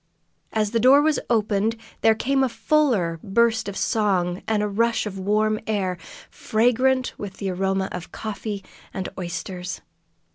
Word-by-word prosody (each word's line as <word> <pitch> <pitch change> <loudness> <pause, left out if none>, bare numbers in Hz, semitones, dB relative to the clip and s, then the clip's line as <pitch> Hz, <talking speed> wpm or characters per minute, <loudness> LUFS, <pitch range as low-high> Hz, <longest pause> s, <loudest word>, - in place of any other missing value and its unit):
As 215 -2 0
the 230 - +1
door 260 +5 +7
was 310 0 +2
opened, 215 -1 +1 0.3
there 225 0 +5
came 270 +4 +1
a 260 - +2
fuller 230 - +1
burst 225 +1 +2
of 195 - -6
song, 190 -5 +1
and 215 -1 +1
a - - +1
rush 230 +3 +1
of 195 -2 -5
warm 215 +2 +1
air, 195 -4 0 0.4
fragrant 250 +3 +1
with 200 -2 -7
the 195 -2 -2
aroma 190 +1 0
of 180 -1 -7
coffee 210 -2 -5 0.3
and 190 -1 -3
oysters. 180 0 -5
210 Hz, 150 wpm, -23 LUFS, 190-230 Hz, 0.4 s, door